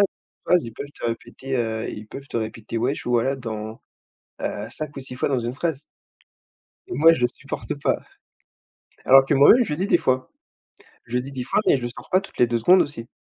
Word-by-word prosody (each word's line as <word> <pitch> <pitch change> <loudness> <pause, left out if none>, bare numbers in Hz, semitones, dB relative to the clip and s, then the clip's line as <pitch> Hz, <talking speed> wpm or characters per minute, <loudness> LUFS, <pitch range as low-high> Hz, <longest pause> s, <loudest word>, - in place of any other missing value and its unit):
une 200 - -3
phrase, 180 -2 +4
ils 115 - -8
peuvent 140 +5 -8
te - - -5
répéter, 120 +3 -4
heu, 110 -2 -2
ils 105 0 -7
peuvent 140 +5 -10
te - - -4
répéter 115 0 -4
«wesh» 125 +4 -1
voilà 120 +2 +2
dans, 110 -3 -6 0.6
heu, 105 +1 -3
5 150 +2 -4
ou - - -4
6 130 -1 -4
fois - - 0
dans 135 -3 +1
une 120 +1 -3
phrase 155 -2 -2 1.1
et - - -5
moi, 165 +3 +6
je 125 - +1
supporte 140 - -5
pas. - - +2 1.1
Alors 135 +1 +7
que 140 - +1
moi-même, 145 - +7
je - - -6
le 150 - -1
dis 190 - 0
des 190 - +4
fois. 130 -3 0 0.8
Je 120 - -5
le 125 - +2
dis 135 +2 -8
des 130 -2 -4
fois, 135 - +1
mais - - +5
je - - -7
le 120 - -2
sors - - -11
pas 185 - +3
toutes 200 - -14
les 120 - +4
2 120 0 0
secondes 180 +11 +6
aussi. 115 -5 -4
130 Hz, 225 wpm, -23 LUFS, 115-145 Hz, 1.1 s, Alors